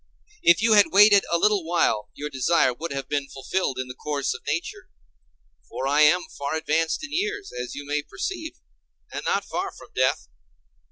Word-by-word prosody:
If 170 +5 +4
you 225 -1 +4
had 205 -1 +6
waited 205 0 +6
a 170 - +3
little 205 0 +2
while, 160 -11 0
your 150 +1 -6
desire 130 0 +2
would 165 +6 -6
have 135 -1 -4
been 145 -1 -2
fulfilled 135 +2 -2
in 130 0 -3
the 125 - -7
course 140 +1 -2
of - - -9
nature. - - -4 0.8
For 135 - -4
I 145 +2 +3
am 175 +4 +5 0.2
far 140 +2 -2
advanced 160 - 0
in 310 -1 -7
years, 405 +2 -2
as 125 0 -6
you 145 - -7
may 150 +1 -1
perceive 325 - -5 0.6
and - - -5
not - - 0
far 375 +2 -3
from - - -15
death. 130 - 0
160 Hz, 185 wpm, -24 LUFS, 140-205 Hz, 0.8 s, had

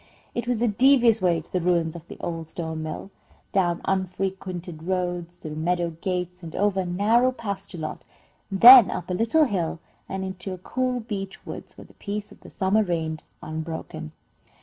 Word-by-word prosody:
It 240 0 -3
was 240 -2 +1
a - - +4
devious 235 0 +5
way 175 -3 +2
to 155 - -16
the 180 - +1
ruins 170 -2 +1
of 170 0 -10
the - - -10
old 165 -2 -4
stone 160 -1 -5
mill, 155 +5 -6 0.4
down 175 -3 +1
unfrequented 185 -3 -3
roads, 175 -1 -2
through 155 - -7
meadow 170 +1 0
gates, 180 -1 -3
and 165 -2 -8
over 200 -1 +1
a 185 - 0
narrow 220 +8 +3
pasture 200 -6 -5
lot, 155 -1 -5 0.5
then 235 +3 +10
up 180 +1 -4
a - - 0
little 230 - +3
hill 180 - -1 0.3
and 190 0 -3
into 190 0 -5
a - - -12
cool 250 +6 -2
beech 200 -4 -6
woods, - - -8
where - - -11
the - - -19
peace 205 0 -5
of - - -15
the - - -13
summer 200 +2 +2
reigned 160 -5 -2 0.2
unbroken. 160 0 -6
185 Hz, 180 wpm, -25 LUFS, 170-205 Hz, 0.5 s, then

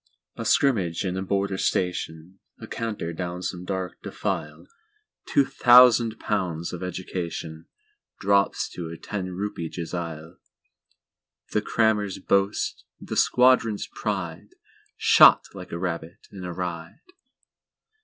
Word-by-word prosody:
A - - -6
scrimmage 95 - +2
in 90 -1 -2
a 95 - -2
Border 100 0 -1
Station—A 90 0 -3
canter 105 -7 -4
down 90 +1 -5
some 90 -1 -4
dark 95 -1 -4
defile—Two 425 - -4
thousand 120 -3 +6
pounds 90 -5 -2
of 90 - -6
educationDrops 95 - -3
to 85 -2 -6
a 85 - -8
ten 95 0 -5
rupee 90 -3 -4
jezail—The 85 -1 -8
Crammer's 105 -4 +1
boast, 100 +1 0 0.2
the - - -6
Squadron's 125 -4 +3
pride, 95 -6 -4 0.4
Shot - - +7
like - - -10
a 85 - -3
rabbit 85 +1 -5
in 95 -2 -9
a 90 - -4
ride! 85 -1 -6
95 Hz, 105 wpm, -25 LUFS, 85-105 Hz, 0.4 s, Shot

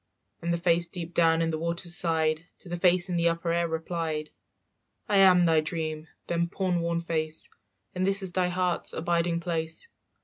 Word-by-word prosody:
And 170 +1 -2
the 170 - +1
face 170 0 +3
deep 175 -2 -7
down 165 -1 +3
in 165 - 0
the 155 - -3
water's 170 +1 -1
side 160 -1 0
To 180 - -11
the 175 - -3
face 180 0 +3
in 180 -2 -2
the 170 0 +3
upper 170 0 -2
air 170 0 +1
replied, 160 -1 -3 0.8
"I 205 - +3
am 185 -2 +6
thy 160 -2 +4
dream, 155 -1 -4 0.2
them 170 0 -1
poor 185 +1 -2
worn 170 0 -1
face, 160 -2 -3 0.4
And 185 - -2
this 195 0 +2
is 185 - 0
thy 180 0 +1
heart's 180 -1 -1
abiding 170 0 0
place. 165 - -3
170 Hz, 190 wpm, -27 LUFS, 165-175 Hz, 0.8 s, am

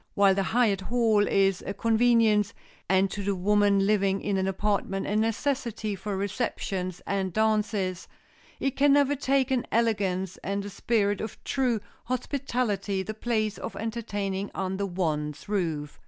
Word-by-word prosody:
While 200 -1 +5
the 195 - +1
hired 210 -1 +2
hall 220 -1 +2
is 195 -1 +2
a 200 - -4
convenience, 225 -2 +3 0.3
and 190 0 +3
to 205 - -4
the 200 0 0
woman 200 +1 +3
living 195 -2 +2
in 200 0 -1
an 190 0 0
apartment 195 0 -1
a 205 - -1
necessity 225 -1 -1
for 195 +1 -4
receptions 195 -3 -3
and 195 -2 -1
dances, 210 -3 0 0.5
it 275 -1 -1
can 280 0 +4
never 285 0 +4
take 270 -1 +1
in 255 -2 0
elegance 195 -5 0
and 200 +1 -2
the 205 - -7
spirit 205 -2 0
of 220 - -7
true 250 -5 0 0.2
hospitality 240 -6 -1
the 215 - -5
place 215 -1 -1
of - - -6
entertaining 205 -4 -3
under 190 +1 -2
one's 150 -5 -2
roof. 165 -8 -2
205 Hz, 150 wpm, -27 LUFS, 195-230 Hz, 0.5 s, While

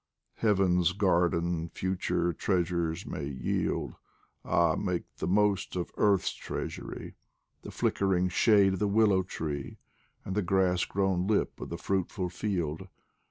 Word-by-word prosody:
Heaven's 95 -5 +3
garden 85 -3 +1
future 90 -2 -1
treasures 85 -1 -1
may 70 - -4
yield 65 -3 -2 0.5
Ah, 85 -2 +3
make 90 -4 -1
the - - -3
most 100 0 +1
of 90 -1 -3
earth's 100 -3 +2
treasury! - - -6 0.5
The - - -9
flickering 95 -2 +1
shade 100 +1 +4
of 95 - -3
the 105 - +1
willow 100 -2 +4
tree, 75 -6 -5 0.5
And 95 - -3
the 105 - +1
grass 90 -1 +2
grown 95 -2 0
lip 105 -1 0
of - - -6
the 85 - -4
fruitful 95 0 -2
field. 90 -3 -3
90 Hz, 130 wpm, -29 LUFS, 85-95 Hz, 0.5 s, shade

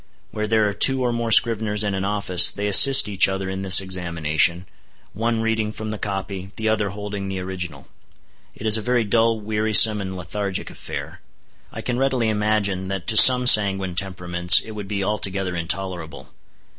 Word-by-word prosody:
Where 105 0 -5
there 110 -1 0
are 100 - -4
two 130 +5 +2
or 120 -1 -2
more 115 -1 -5
scriveners 110 -2 +2
in 100 -1 -4
an 95 0 -5
office, 100 -3 +3
they 100 - -7
assist 105 +5 +7
each 100 -2 +1
other 95 0 -6
in 95 0 -7
this 95 -2 +7
examination, 85 -2 -3 0.5
one 115 +2 -3
reading 110 -1 -3
from 110 0 -8
the 110 - -8
copy, 95 -1 -7
the 110 - -5
other 105 -2 -2
holding 100 0 -8
the 95 -1 -6
original. 90 -6 -9 0.7
It 110 - -12
is 110 0 +4
a - - -6
very 125 +1 -2
dull, 115 +1 -1
wearisome, 105 0 +3
and 95 -1 -8
lethargic 95 +2 -6
affair. - - -10 0.5
I - - -9
can 120 0 -5
readily 130 -4 -2
imagine 105 -3 -3
that 95 -2 -7
to 110 - -1
some 125 +2 +8
sanguine 95 -5 +3
temperaments 90 -2 +1
it 110 - -12
would 105 -2 -10
be 100 -1 -5
altogether 95 -3 -5
intolerable. 85 -1 -7
100 Hz, 180 wpm, -19 LUFS, 95-110 Hz, 0.7 s, some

